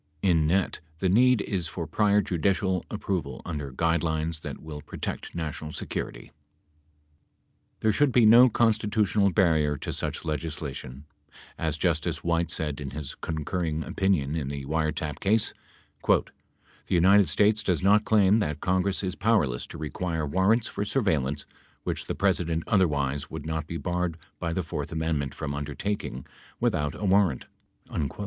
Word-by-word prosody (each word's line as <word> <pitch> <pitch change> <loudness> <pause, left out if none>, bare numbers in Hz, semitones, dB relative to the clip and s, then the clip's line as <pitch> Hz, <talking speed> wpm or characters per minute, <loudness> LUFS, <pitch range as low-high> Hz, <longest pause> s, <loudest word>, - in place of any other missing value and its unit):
In 85 -5 +3
net, 95 +3 +1 0.2
the 95 +3 0
need 125 +3 +5
is 90 -5 -2
for 80 +2 -5
prior 105 +6 +3
judicial 95 +1 0
approval 100 -4 -3
under 75 -4 -4
guide 85 +6 +1
lines 80 -1 -1
that - - -6
will 75 -2 -8
protect - - -6
national 80 -2 -4
security. - - -5 1.5
There 110 - +3
should 145 +6 +3
be 120 -2 +5
no 120 +4 +8
constitutional 105 -3 +2
barrier 80 -7 +2
to - - -4
such - - -4
legislation. 75 -4 -5 0.5
As - - -2
Justice - - 0
White 85 -1 +1
said 75 -4 -2
in 70 - -4
his 75 0 -6
concurring 80 0 -3
opinion 80 -3 0
in 75 -4 -2
the 70 -1 -5
wiretap 80 0 -1
case, 105 +2 +1 0.5
"the - - +5 0.7
United 95 +1 +5
States 105 +6 +3
does 90 -4 0
not 105 +2 +5
claim 105 -1 +4
that 75 -7 -1
Congress 95 +3 0
is 95 -1 -1
powerless 95 - +1
to - - -9
require 80 +1 -3
warrants 95 +9 +2
for 100 - -3
surveillance 75 - 0 0.4
which - - -3
the - - -2
President 85 -4 +1
otherwise 75 -8 +1
would - - -7
not 80 -1 -3
be 85 - -4
barred 90 -1 -2 0.2
by 85 - -2
the 90 +2 -1
fourth 75 -2 -5
amendment 80 -4 -1
from 70 -2 -4
undertaking 75 -1 -4 0.3
without 75 -2 0
a 105 - -4
warrant." 95 -8 +3
85 Hz, 150 wpm, -27 LUFS, 75-100 Hz, 1.5 s, no